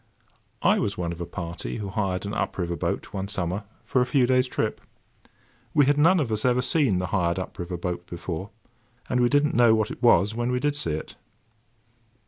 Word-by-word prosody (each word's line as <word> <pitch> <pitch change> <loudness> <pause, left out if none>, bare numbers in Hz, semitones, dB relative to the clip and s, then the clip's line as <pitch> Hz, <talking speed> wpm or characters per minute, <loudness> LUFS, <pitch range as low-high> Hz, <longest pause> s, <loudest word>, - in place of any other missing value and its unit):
I - - +4
was 100 -1 -1
one 85 -2 -2
of 85 0 -7
a 85 - -4
party 85 -8 -5
who 100 -2 -5
hired 95 -1 -2
an 100 - -4
up - - -2
river 85 -2 -1
boat - - -3
one 95 0 -3
summer, 95 +1 -2 0.2
for 125 - +2
a - - +3
few 135 -3 +3
days' 130 0 +3
trip. - - -2 0.9
We 145 -2 +6
had 145 +1 +3
none 175 +4 +5
of 130 -7 -1
us 110 0 0
ever 125 0 +2
seen 135 - +2
the 90 - -1
hired 85 -3 +1
up 95 - -6
river 90 0 -4
boat 90 0 -4
before; 85 +2 -5 0.6
and 125 -1 +2
we 120 - +4
did 145 +2 +3
not 150 - -1
know 120 -2 +5
what 110 -1 0
it - - -8
was 105 -4 +5
when 120 +2 -1
we 125 - +1
did 145 +2 0
see 85 - -1
it. 75 - -6
105 Hz, 220 wpm, -25 LUFS, 90-125 Hz, 0.9 s, We